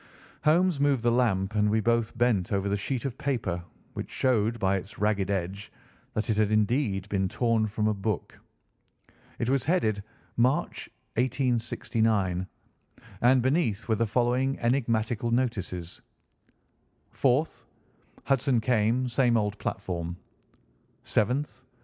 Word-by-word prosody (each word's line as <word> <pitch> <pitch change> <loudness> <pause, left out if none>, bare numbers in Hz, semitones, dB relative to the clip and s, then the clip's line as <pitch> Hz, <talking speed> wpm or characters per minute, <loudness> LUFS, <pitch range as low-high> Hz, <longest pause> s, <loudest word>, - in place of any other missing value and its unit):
Holmes 170 0 +3
moved 140 -4 +2
the 120 - +3
lamp, 110 -5 +1
and 105 -1 +2
we 110 +1 +2
both 115 +1 0
bent 120 -7 +1
over 100 -1 0
the 100 - +1
sheet 125 +6 -3
of 130 -1 -4
paper, 115 - -2 0.3
which - - -5
showed 115 -3 +1
by 95 -2 +1
its 95 +2 -9
ragged 105 -2 0
edge 100 +1 -3 0.4
that 110 - -1
it 105 - 0
had 110 -1 +2
indeed 110 -2 +1
been 95 -2 0
torn 115 -1 +1
from 105 0 -1
a 110 - +2
book. 100 0 -3 1.0
It 115 - -2
was 135 0 +1
headed, 110 - +1 0.4
"March, 125 +4 +1 0.3
1869," 115 -6 0 0.7
and 125 +1 +5
beneath 130 - 0
were 115 - +2
the 115 +1 +1
following 125 +4 +1
enigmatical 120 -2 0
notices: 100 -8 -2 1.1
"4th. 135 +4 +1 0.6
Hudson 135 -2 +2
came. 115 +2 +1
Same 120 -1 +2
old 105 -1 -1
platform. 85 -2 -4 0.9
"7th. 125 +7 0
115 Hz, 130 wpm, -27 LUFS, 100-125 Hz, 1.1 s, and